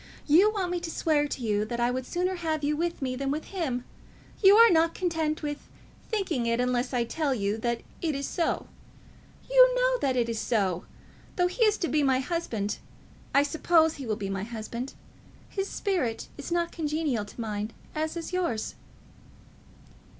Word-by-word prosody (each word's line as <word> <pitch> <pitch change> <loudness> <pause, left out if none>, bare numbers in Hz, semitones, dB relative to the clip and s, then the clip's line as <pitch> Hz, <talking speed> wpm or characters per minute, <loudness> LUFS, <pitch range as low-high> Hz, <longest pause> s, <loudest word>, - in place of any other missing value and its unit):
You 345 +8 +6
want 380 -4 -2
me 355 - 0
to 340 -1 -5
swear 305 -3 +1
to 265 - -5
you 210 -2 +1
that 235 +2 -4
I 240 +1 +2
would 255 0 -3
sooner 360 +1 0
have 315 -3 -2
you 295 +1 +1
with 335 -2 -2
me 255 -1 -1
than 275 +1 -2
him. 315 -9 -3 0.6
You 395 0 +8
are 460 0 +8
not 330 0 +3
content 320 -3 -1
with 295 -1 -5 0.4
thinking 360 - -1
it, 230 +1 +1
unless 250 0 0
I 245 -2 +1
tell 280 +3 -1
you 200 -2 0
that 235 +1 -1 0.2
it 315 -4 0
is 275 0 -2
so. 340 - -1 0.8
You - - +6
know - - +2
that 265 -2 +1
it 235 -1 +2
is 230 -1 -2
so. 195 -8 0 0.5
Though 355 - +3
he 365 +7 +1
is 425 -1 +3
to 345 - -1
be 305 -1 +2
my 265 -2 +3
husband, 260 - -2 0.6
I 280 - +6
suppose 320 +2 +3
he 270 -3 -6
will 215 - 0
be 200 -2 -4
my 195 -1 -2
husband, 235 +3 -6 0.5
his 390 0 -3
spirit 290 - -1
is 285 +3 -7
not 340 0 +1
congenial 300 -7 -1
to 205 - -14
mine, 215 -1 -3 0.2
as 315 +2 -2
is 335 +2 -6
yours." 335 -12 -1
295 Hz, 185 wpm, -28 LUFS, 240-345 Hz, 0.8 s, You